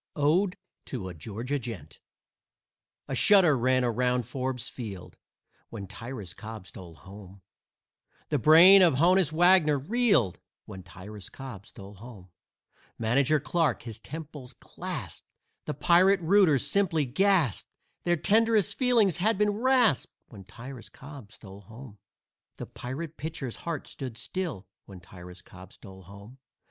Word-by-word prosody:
ODE 170 +6 +1 0.3
TO 100 -8 -6
A - - -8
GEORGIA 115 - -5
GENT 105 - -9 1.1
A - - -5
shudder 190 -8 +5
ran 130 +1 +1
around 125 +1 0
Forbes 130 0 -4
Field 105 -7 -9 0.5
When 105 -4 -8
Tyrus 105 -1 -8
Cobb 110 -1 -10
stole 85 -4 -12
home. 95 +2 -14 0.9
The 150 - 0
brain 170 - +8
of 170 -7 +4
Honus 175 +2 +3
Wagner 165 -2 +4
reeled 200 - +1 0.3
When 95 - -10
Tyrus 95 +3 -11
Cobb 125 -8 -10
stole 100 +1 -12
home. 100 -3 -13 0.7
Manager 135 +6 +1
Clarke 145 0 -1
his 115 -2 -9
temples 145 -2 -9
clasped, - - -8 0.4
The - - -4
Pirate 180 +6 +3
rooters 170 - +3
simply 165 -7 +1
gasped 165 - +1 0.3
Their 175 0 +1
tenderest 215 +2 +2
feelings 235 - +2
had 210 +4 +1
been 210 0 +2
rasped 240 - +1 0.2
When 100 -5 -13
Tyrus 125 +3 -11
Cobb 135 -6 -13
stole 100 -3 -13
home. 110 +1 -13 0.6
The - - -6
Pirate 150 +6 -8
pitcher's 150 -5 -6
heart 165 -4 -5
stood 130 -5 -8
still 140 - -5 0.2
When 95 -2 -11
Tyrus 90 +1 -13
Cobb 95 +1 -14
stole 95 -3 -14
home. 100 +7 -14
130 Hz, 135 wpm, -27 LUFS, 105-170 Hz, 1.1 s, brain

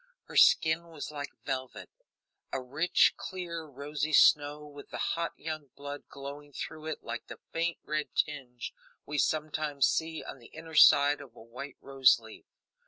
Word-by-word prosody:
Her - - -12
skin 160 +2 +5
was 160 -2 -7
like 145 -1 -5 0.2
velvet; 130 -1 -4 0.6
a 135 - -1
rich, 145 +7 +3
clear, 170 -3 -5
rosy 145 +1 -4
snow, 150 0 +5
with 145 -1 -12
the - - -6
hot 170 -1 -1
young 155 -2 -5
blood 145 0 -7
glowing 140 +1 -9
through 155 +3 -6
it 160 - -4
like - - -5
the - - -8
faint 170 +1 -1
red 155 0 -3
tinge 130 -5 -2 0.3
we 150 0 -2
sometimes 150 -1 +1
see 160 0 -1
on - - -8
the 120 - -14
inner 160 0 -11
side 145 -1 +7
of 130 -5 -13
a - - -12
white 125 +4 -9
rose 135 -2 +5
leaf. 110 -1 -13
145 Hz, 165 wpm, -30 LUFS, 140-155 Hz, 0.6 s, side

